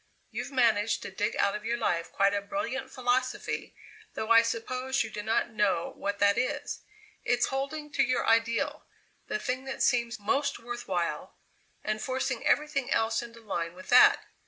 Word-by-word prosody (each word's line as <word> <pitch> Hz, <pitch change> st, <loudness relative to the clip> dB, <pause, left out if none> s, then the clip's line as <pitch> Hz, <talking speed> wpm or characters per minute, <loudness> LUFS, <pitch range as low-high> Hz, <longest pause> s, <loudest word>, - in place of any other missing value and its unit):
You've 245 Hz, +3 st, -4 dB
managed 225 Hz, -5 st, +2 dB
to -, -, -6 dB
dig 205 Hz, +2 st, -1 dB
out 200 Hz, -, +2 dB
of 210 Hz, -, -6 dB
your 235 Hz, +2 st, -1 dB
life 170 Hz, -6 st, -1 dB
quite 195 Hz, 0 st, +3 dB
a 205 Hz, -, 0 dB
brilliant 265 Hz, +4 st, -3 dB
philosophy, 255 Hz, +1 st, -1 dB, 0.4 s
though 220 Hz, +1 st, -2 dB
I 230 Hz, 0 st, +9 dB
suppose 255 Hz, +3 st, -1 dB
you 225 Hz, -, -7 dB
do 210 Hz, -, -4 dB
not 225 Hz, +2 st, 0 dB
know 200 Hz, -6 st, 0 dB
what 200 Hz, 0 st, -3 dB
that 200 Hz, 0 st, +4 dB
is. 290 Hz, +3 st, -2 dB, 0.4 s
It's 245 Hz, 0 st, +2 dB
holding 285 Hz, +3 st, -3 dB
to 275 Hz, -, +1 dB
your 255 Hz, -1 st, +1 dB
ideal, 230 Hz, +1 st, +1 dB, 0.4 s
the -, -, -1 dB
thing 255 Hz, +4 st, -3 dB
that 265 Hz, -, -2 dB
seems 235 Hz, -3 st, +1 dB
most 280 Hz, +8 st, 0 dB
worth 240 Hz, 0 st, -7 dB
while, 175 Hz, -3 st, -2 dB, 0.5 s
and 215 Hz, 0 st, -2 dB
forcing 260 Hz, -1 st, -2 dB
everything 285 Hz, -3 st, +1 dB
else 225 Hz, -2 st, +1 dB
into 230 Hz, -1 st, -11 dB
line 170 Hz, -5 st, -3 dB
with 185 Hz, -, -12 dB
that. -, -, +7 dB
230 Hz, 175 wpm, -29 LUFS, 210-255 Hz, 0.5 s, I